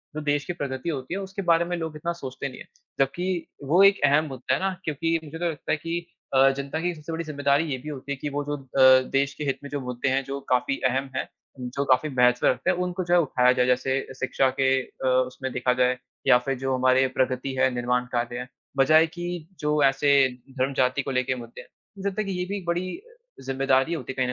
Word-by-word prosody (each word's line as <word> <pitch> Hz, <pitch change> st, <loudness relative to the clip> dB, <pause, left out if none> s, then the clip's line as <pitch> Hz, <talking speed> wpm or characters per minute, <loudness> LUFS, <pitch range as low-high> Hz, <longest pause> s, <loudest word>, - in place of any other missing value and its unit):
जो 155 Hz, -, -3 dB
देश 145 Hz, -1 st, 0 dB
की 175 Hz, -, -3 dB
प्रगति 140 Hz, -1 st, -4 dB
होती 135 Hz, -1 st, -4 dB
है, 195 Hz, -, -2 dB
उसके 195 Hz, 0 st, -5 dB
बारे 170 Hz, -1 st, +3 dB
में 175 Hz, +1 st, -2 dB
लोग 160 Hz, -2 st, -4 dB
इतना 170 Hz, +3 st, -3 dB
सोचते 135 Hz, -4 st, -6 dB
नहीं 125 Hz, -, -12 dB
है। -, -, -10 dB, 0.3 s
जबकि 175 Hz, +6 st, -1 dB, 0.2 s
वो 170 Hz, +8 st, +4 dB
एक 195 Hz, 0 st, +6 dB
अहम 145 Hz, +2 st, +4 dB
मुद्दा 130 Hz, -3 st, -3 dB
है -, -, +1 dB
ना 190 Hz, 0 st, 0 dB
क्योंकि 165 Hz, +1 st, 0 dB
मुझे 155 Hz, +2 st, -8 dB
तो 175 Hz, 0 st, -1 dB
लगता 150 Hz, -, -6 dB
है -, -, +2 dB
कि 165 Hz, +3 st, -3 dB, 0.4 s
अ, 135 Hz, +1 st, +7 dB
जनता 140 Hz, +3 st, -3 dB
की 175 Hz, 0 st, -1 dB
सबसे 155 Hz, +1 st, -9 dB
बड़ी 165 Hz, +1 st, -3 dB
ज़िम्मेदारी 145 Hz, -1 st, +1 dB
ये 130 Hz, -, -1 dB
भी 130 Hz, +4 st, -8 dB
होती 140 Hz, -1 st, -7 dB
है -, -, 0 dB
कि 150 Hz, -, -2 dB
वो 145 Hz, +1 st, -2 dB
जो 145 Hz, 0 st, -3 dB
अ, 130 Hz, -1 st, +4 dB
देश 140 Hz, 0 st, +1 dB
के 150 Hz, -, -6 dB
हित 135 Hz, -2 st, -1 dB
में 140 Hz, -, -7 dB
जो 145 Hz, -1 st, -3 dB
मुद्दे 125 Hz, +2 st, -2 dB
हैं 135 Hz, +1 st, +1 dB
जो 140 Hz, +1 st, -4 dB
काफ़ी 125 Hz, +2 st, +1 dB
अहम 135 Hz, +2 st, -2 dB
हैं, -, -, -2 dB, 0.3 s
जो 125 Hz, +3 st, -3 dB
काफ़ी 130 Hz, +4 st, +3 dB
महत्व 125 Hz, -2 st, +3 dB
रखते 130 Hz, +5 st, +1 dB
हैं, 185 Hz, -, +2 dB
उनको 180 Hz, 0 st, -2 dB
जो 175 Hz, 0 st, 0 dB
है 175 Hz, -, +6 dB
उठाया 125 Hz, -4 st, +3 dB
जाए, 125 Hz, -1 st, +2 dB
जैसे 130 Hz, +1 st, +1 dB, 0.2 s
शिक्षा 130 Hz, 0 st, +1 dB
के 135 Hz, 0 st, +4 dB
अ, 130 Hz, -, -6 dB, 0.2 s
उसमें 130 Hz, +1 st, -6 dB
देखा 125 Hz, 0 st, +1 dB
जाए 125 Hz, 0 st, +3 dB, 0.3 s
या 125 Hz, -, +8 dB
फिर 130 Hz, +2 st, -3 dB
जो 135 Hz, 0 st, 0 dB
हमारे 130 Hz, +1 st, +3 dB
प्रगति 130 Hz, +1 st, 0 dB
है 130 Hz, -, +4 dB
निर्माण 125 Hz, 0 st, 0 dB
कार्य 120 Hz, 0 st, -1 dB
है, 125 Hz, -, -6 dB, 0.3 s
बजाय 155 Hz, +4 st, +5 dB
कि 175 Hz, 0 st, -6 dB
जो 150 Hz, 0 st, +1 dB
ऐसे 135 Hz, +1 st, +3 dB, 0.5 s
धर्म 130 Hz, +2 st, 0 dB
जाति 130 Hz, +2 st, +1 dB
को 135 Hz, -, -4 dB
लेके 130 Hz, 0 st, 0 dB
मुद्दे 120 Hz, -1 st, -9 dB
हैं। -, -, -17 dB, 0.3 s
मुझे 195 Hz, +1 st, -1 dB
लगता 200 Hz, +2 st, -3 dB
है -, -, -3 dB
कि 195 Hz, -, -3 dB
ये 180 Hz, -, -1 dB
भी 200 Hz, +2 st, -3 dB
एक 190 Hz, -, -8 dB
बड़ी 180 Hz, -, -2 dB, 0.4 s
ज़िम्मेदारी 135 Hz, +3 st, +1 dB
होती 155 Hz, -, -4 dB
है -, -, -20 dB
कहीं 130 Hz, -1 st, 0 dB
140 Hz, 245 wpm, -25 LUFS, 130-165 Hz, 0.5 s, या